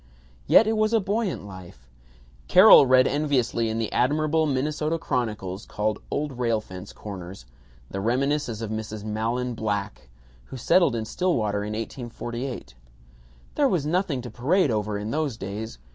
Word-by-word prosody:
Yet 225 - +7
it 220 +1 0
was 215 +1 +1
a 225 - +5
buoyant 205 - -2
life. 90 -11 -12 0.6
Carol 135 - +8
read 130 0 +5
enviously 130 -6 0
in 110 - -2
the 115 -2 -2
admirable 155 +4 +1
Minnesota 150 +4 -1
chronicles 110 - -3
called 105 0 -2
"Old 145 -4 -3
Rail 115 -3 +1
Fence 95 -2 -10
Corners" 95 - -9 0.5
the 95 - -4
reminiscence 125 +1 0
of 110 -1 -4
Mrs. 110 -1 -5
Mahlon 115 +4 -2
Black, 105 - -4 0.4
who 130 - -9
settled 140 +1 +3
in 110 -1 -3
Stillwater 110 - -1
in 105 +1 -4
1848: 120 - -6 0.8
"There 285 -2 +2
was 170 - 0
nothing 155 -5 -1
to 125 - -8
parade 155 +4 +1
over 105 -1 -1
in 105 +2 -4
those 150 -6 -1
days. 105 - -6
120 Hz, 150 wpm, -25 LUFS, 105-150 Hz, 0.8 s, Carol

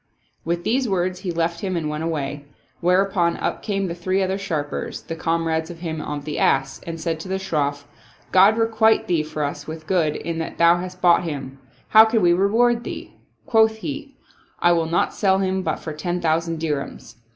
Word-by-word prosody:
With 170 +1 -2
these 250 +1 +1
words 185 -1 0
he 180 - -3
left 170 0 -1
him 185 -2 -2
and 160 -2 -2
went 150 +1 -3
away, 145 -3 -3 0.3
whereupon 180 -1 +2
up - - -2
came 195 -2 -1
the 170 - -3
three 185 +3 0
other 190 +1 -1
sharpers, 155 -7 -4
the 165 - -5
comrades 165 0 -1
of 170 -1 -10
him 160 -3 -4
of 145 -1 -5
the 150 - -3
ass, 135 0 +1
and 165 -1 -5
said 160 0 -2
to 165 - -8
the 190 +1 -1
Shroff, 145 -6 -2 0.2
" - - -30
God 195 +4 +6
requite 225 -1 +3
thee 170 -3 +1
for 155 0 -4
us 145 0 -4
with 160 0 -7
good, 160 -4 +1
in 165 0 -4
that 160 - -5
thou 170 +1 +5
hast 180 +1 -7
bought 175 0 +5
him 135 -4 -6
I - - -33 0.2
How 220 0 +8
can 220 -2 +1
we 175 0 +5
reward 230 +6 +2
thee? - - -7 0.2
" - - -42
Quoth 220 -1 +4
he, 280 +3 -7 0.2
" - - -35
I 175 - +4
will 165 -1 +2
not 170 +1 +1
sell 190 -2 +2
him 190 0 0
but - - -1
for 155 - -6
ten 175 +4 -3
thousand 165 0 0
dirhams." 145 -6 -4
170 Hz, 215 wpm, -22 LUFS, 160-190 Hz, 0.3 s, How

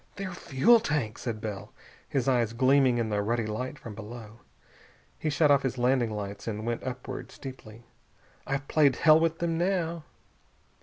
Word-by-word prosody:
"Their 195 -1 -5
fuel 175 - +4
tank!" 145 - -2
said 115 -4 -4
Bell, 105 -3 -6 0.4
his 135 -3 -1
eyes 120 -4 +2
gleaming 130 0 +4
in 115 -2 -1
the 105 -1 0
ruddy 115 +2 0
light 125 +7 -4
from 115 - -9
below. 110 +1 -10 0.8
He 155 - -1
shut 150 0 +3
off 140 -1 +5
his 130 -2 -2
landing 125 -1 +2
lights 100 -1 -6
and 110 -1 -3
went 120 0 -2
upward, 130 -1 -6
steeply. 120 -4 -10 0.6
"I've 135 +1 -2
played 145 -5 +4
hell 155 +2 +6
with 165 0 +1
them 165 -1 -1
now!" 170 -3 -1
130 Hz, 165 wpm, -28 LUFS, 115-150 Hz, 0.8 s, hell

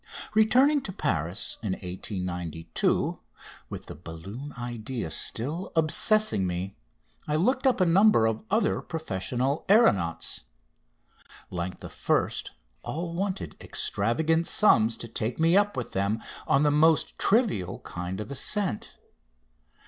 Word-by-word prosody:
Returning 255 +7 +4
to 195 - -6
Paris 95 - -2
in 105 -4 -2
1892, 90 -3 -3 0.5
with - - -7
the - - -8
balloon 95 - -9
idea 120 -5 -5
still 155 +11 +1
obsessing 165 - +3
me, 90 +2 -4 0.5
I 150 - 0
looked 255 - +2
up 255 - +2
a 185 - +4
number 180 - +5
of 110 0 -1
other 220 +4 +1
professional 135 - -2
aeronauts. 100 - +2 1.1
Like 90 0 -4
the - - -7
first, - - -1 0.3
all 165 +2 -4
wanted 190 +2 -3
extravagant 160 +11 0
sums 115 - +3
to 115 - -6
take 115 +3 -3
me 165 +2 +4
up 205 -3 +2
with 125 - -4
them 100 +3 0 0.3
on 140 - +3
the 150 - +3
most 155 +1 +3
trivial 205 - +1
kind 90 +2 -6
of 105 - -6
ascent. 175 - -1
135 Hz, 125 wpm, -27 LUFS, -, 1.1 s, number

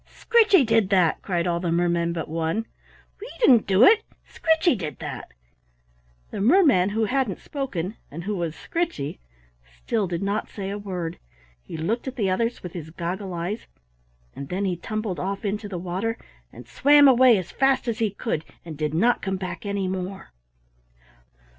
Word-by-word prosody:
"Scritchy 425 - +4
did 225 -4 +2
that," 180 -5 +3
cried 175 -3 -1
all 170 -1 0
the 170 -1 -2
mermen 170 0 +1
but 165 -1 -4
one. 165 +7 -2 0.5
"We 440 +4 -8
didn't 255 - +5
do 195 +3 +5
it. 440 - +7 0.2
Scritchy 320 -1 +2
did 160 -8 -5
that." - - -7 1.0
The - - -4
merman 250 - +5
who 220 +2 0
hadn't 250 -4 0
spoken, 225 - -4
and 165 +4 -7
who 205 +3 -2
was 170 -3 -3
Scritchy, 335 - -3 0.4
still - - -3
did 175 +1 -3
not 200 +2 -2
say 195 -1 -5
a 205 - -3
word. 180 -5 -5 0.4
He 160 - -8
looked 215 +12 -2
at 260 - -4
the 200 -6 0
others 230 +5 -1
with 180 - -7
his 160 -3 -7
goggle 180 +3 -4
eyes 180 +7 -4 0.7
and 140 0 -7
then 190 +3 -1
he 185 -2 0
tumbled 215 +1 -4
off 195 +2 -3
into 205 +1 -3
the 185 - -4
water 185 +6 -3 0.3
and 120 0 -12
swam 285 - +6
away 255 -3 +6
as 185 -2 -5
fast 270 -1 +2
as 230 -2 -2
he 225 -2 +2
could 200 -5 -3 0.2
and 160 -2 -7
did 155 0 -1
not 235 +8 +3
come 190 -1 -2
back 190 +4 -6
any 200 -1 -1
more. 190 +1 -5
195 Hz, 175 wpm, -24 LUFS, 170-230 Hz, 1.0 s, it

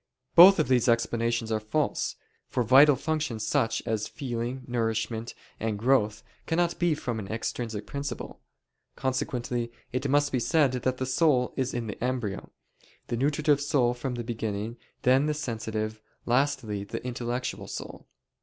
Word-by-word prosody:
Both 190 +3 +10
of - - +2
these 125 -2 +3
explanations 115 0 +1
are 110 - +1
false; 140 +8 -1 0.3
for 125 - 0
vital 135 +5 +7
functions 145 -6 -2
such 115 +1 +1
as 110 -1 -1
feeling, 125 0 -4
nourishment, 115 -1 -2 0.2
and 110 -1 -1
growth 110 -2 +2 0.2
cannot 170 +1 +1
be 175 -3 +2
from 120 -6 -3
an 100 - -6
extrinsic 110 -1 -3
principle. 140 +7 -6 0.5
Consequently 125 -2 -2 0.2
it 130 +2 -1
must 145 +1 +3
be 130 - +1
said 145 +2 +3
that 130 0 -1
the 130 - -2
soul 130 -1 +2
is 130 -1 -1
in 120 -1 -3
the 105 +1 -6
embryo; 125 -6 -2 0.6
the - - 0
nutritive 145 +3 +2
soul 130 -4 +2
from 125 +1 -4
the 120 - -4
beginning, 110 -1 -3 0.3
then 130 +4 +4
the 150 - 0
sensitive, 110 -5 -3 0.2
lastly 125 -5 0
the 100 - -6
intellectual 125 0 -3
soul. - - -8
125 Hz, 150 wpm, -28 LUFS, 115-135 Hz, 0.6 s, Both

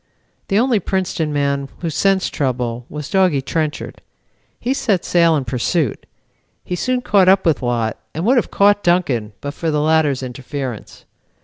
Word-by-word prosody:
The 195 - +1
only 240 -1 +3
Princeton 180 -4 -2
man 140 -1 -1
who 170 -2 -2
sensed 195 +4 +1
trouble 125 -3 -2
was 150 -1 -6
Doggy 180 -6 +2
Trenchard. 155 +1 -3 0.6
He 250 +3 0
set 205 -9 0
sail 170 -2 +4
in 140 -3 -1
pursuit. 125 - -1 0.6
He 180 - -3
soon 250 +7 -1
caught 195 -5 +4
up 190 0 +4
with 160 -4 +2
Lott 120 -3 -1
and 165 +4 -4
would 255 +4 +4
have 240 - +1
caught 205 +1 +3
Duncan, 140 - +1
but 145 0 -5
for 165 +1 -3
the 150 -1 +1
latter's 150 -3 +2
interference. 130 -1 -6
155 Hz, 165 wpm, -19 LUFS, 135-190 Hz, 0.6 s, sail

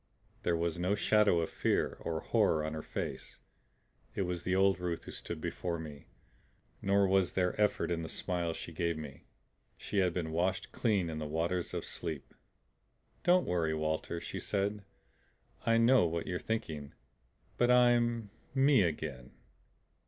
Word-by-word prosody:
There 85 -1 +1
was 85 0 -1
no 90 +3 +1
shadow 105 -4 +4
of 80 - -3
fear - - 0
or 80 -1 -2
horror 95 -9 +2
on 80 - -3
her 80 - -4
face. - - -5 0.8
It 100 - 0
was 90 -1 -3
the 95 +1 0
old 95 -1 +4
Ruth 90 -2 -3
who - - -8
stood - - -5
before 85 -2 -3
me; 75 -3 -9 0.7
nor 100 0 +3
was 95 -2 +2
there 90 -1 +1
effort 105 -3 +2
in 85 -1 0
the 80 - -5
smile 85 -2 -1
she 85 - -7
gave 85 0 -1
me. 75 -3 -9 0.5
She 100 - -2
had 90 -2 +3
been 85 -2 -3
washed 85 +4 -1
clean 100 -7 +1
in 80 -1 -4
the 75 - -3
waters 85 +3 -1
of - - -3
sleep. 80 -5 -5 0.9
"Don't 180 0 +4
worry, 80 -3 0
Walter," 80 +2 -2
she - - -5
said. 100 +1 -1 0.8
"I 115 0 +5
know 115 -4 +5
what 85 0 -2
you're 90 -2 -2
thinking. 80 -10 -4 0.6
But 120 - +3
I'm 120 -3 +4 0.2
ME 135 -2 +5
again." 75 -7 -3
90 Hz, 160 wpm, -32 LUFS, 80-100 Hz, 0.9 s, I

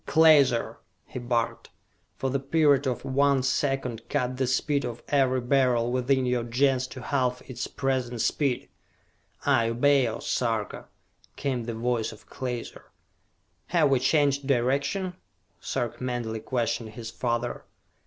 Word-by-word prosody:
"Klaser," 145 -7 +5 0.3
he - - -7
barked, 120 -1 -2 0.5
"for 135 - -1
the 140 - 0
period 145 -1 +3
of 125 - -2
one 140 0 +2
second 130 -3 -1
cut 130 -3 0
the 130 -1 0
speed 140 +2 +1
of 120 -1 -5
every 130 -3 +2
Beryl 120 -2 +2
within 130 +1 +1
your 125 -1 0
Gens 130 +2 +1
to 130 - -9
half 125 -3 -1
its 130 -1 -4
present 130 -3 -2
speed!" 135 +2 0 0.8
"I 120 -5 +3
obey, 135 +2 +3
O 110 - -3
Sarka!" 115 -4 -2 0.5
came 125 -4 -2
the 115 -1 -4
voice 115 -1 -1
of 110 - -15
Klaser. 125 -2 -5 0.8
"Have 160 -5 +3
we 135 - +4
changed 140 0 +2
direction?" 140 +9 0 0.5
Sarka 120 +1 -3
mentally 120 -3 -2
questioned 115 -1 -2
his 115 0 -7
father. 120 0 -2
130 Hz, 135 wpm, -27 LUFS, 120-140 Hz, 0.8 s, Klaser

